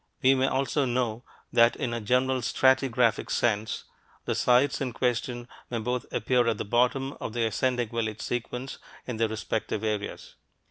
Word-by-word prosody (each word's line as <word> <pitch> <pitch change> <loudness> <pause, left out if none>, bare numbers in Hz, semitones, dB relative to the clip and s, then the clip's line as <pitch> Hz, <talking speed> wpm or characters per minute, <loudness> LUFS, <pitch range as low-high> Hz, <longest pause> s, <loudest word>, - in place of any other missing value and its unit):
We 130 +1 +7
may 130 0 +2
also 135 +2 +1
know 120 -2 -1 0.3
that 115 0 +5
in 125 -4 -3
a 115 - -3
general 125 +4 +1
stratigraphic 130 -1 +2
sense, 110 -2 0 0.4
the - - 0
sites 125 +4 +3
in 130 -3 -2
question 120 0 -1 0.2
may 120 - -2
both 125 +2 -2
appear 120 +1 +2
at 115 -2 +1
the - - -4
bottom 125 +5 +1
of 110 - -4
the 120 -1 +1
ascending 120 +1 0
village 110 -2 -3
sequence 125 +2 -4 0.3
in 125 -3 -4
their 115 0 +2
respective 110 0 -3
areas. 105 -2 -4
120 Hz, 165 wpm, -27 LUFS, 115-130 Hz, 0.4 s, We